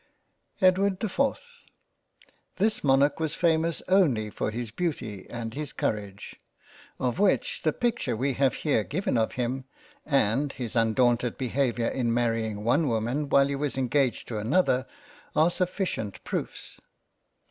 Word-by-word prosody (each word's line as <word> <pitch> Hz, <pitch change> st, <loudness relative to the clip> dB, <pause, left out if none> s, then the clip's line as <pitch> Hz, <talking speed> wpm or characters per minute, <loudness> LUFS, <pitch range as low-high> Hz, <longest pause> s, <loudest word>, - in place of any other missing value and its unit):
EDWARD 185 Hz, +1 st, +4 dB
the -, -, -1 dB
4th 280 Hz, -, -2 dB, 1.0 s
THIS 215 Hz, +3 st, 0 dB
Monarch 140 Hz, +1 st, +3 dB
was 160 Hz, -2 st, -1 dB
famous 165 Hz, -1 st, +1 dB
only 140 Hz, -, +3 dB
for -, -, -2 dB
his 115 Hz, 0 st, -5 dB
Beauty 115 Hz, -, -4 dB
and 115 Hz, -2 st, -5 dB
his 150 Hz, 0 st, -5 dB
Courage, 100 Hz, -2 st, -4 dB, 0.6 s
of 125 Hz, -2 st, -1 dB
which 200 Hz, -1 st, +1 dB
the 155 Hz, -, +2 dB
Picture 225 Hz, -, -1 dB
we 135 Hz, +3 st, 0 dB
have 135 Hz, +1 st, +2 dB
here 140 Hz, -8 st, +1 dB
given 155 Hz, -, -2 dB
of 110 Hz, -1 st, +1 dB
him, 125 Hz, +1 st, -2 dB, 0.4 s
and 135 Hz, 0 st, +1 dB
his 125 Hz, -1 st, -5 dB
undaunted 120 Hz, +1 st, +2 dB
Behaviour 125 Hz, -2 st, 0 dB
in 120 Hz, -3 st, -1 dB
marrying 115 Hz, -3 st, 0 dB
one 145 Hz, +7 st, +2 dB
Woman 120 Hz, +5 st, -1 dB
while 140 Hz, 0 st, +5 dB
he 140 Hz, -, -2 dB
was 140 Hz, -1 st, -2 dB
engaged 130 Hz, 0 st, +1 dB
to 110 Hz, -3 st, -3 dB
another, 130 Hz, -, +2 dB, 0.5 s
are 160 Hz, +3 st, +4 dB
sufficient 180 Hz, -, -2 dB
proofs. -, -, -5 dB
135 Hz, 140 wpm, -27 LUFS, 115-160 Hz, 1.0 s, while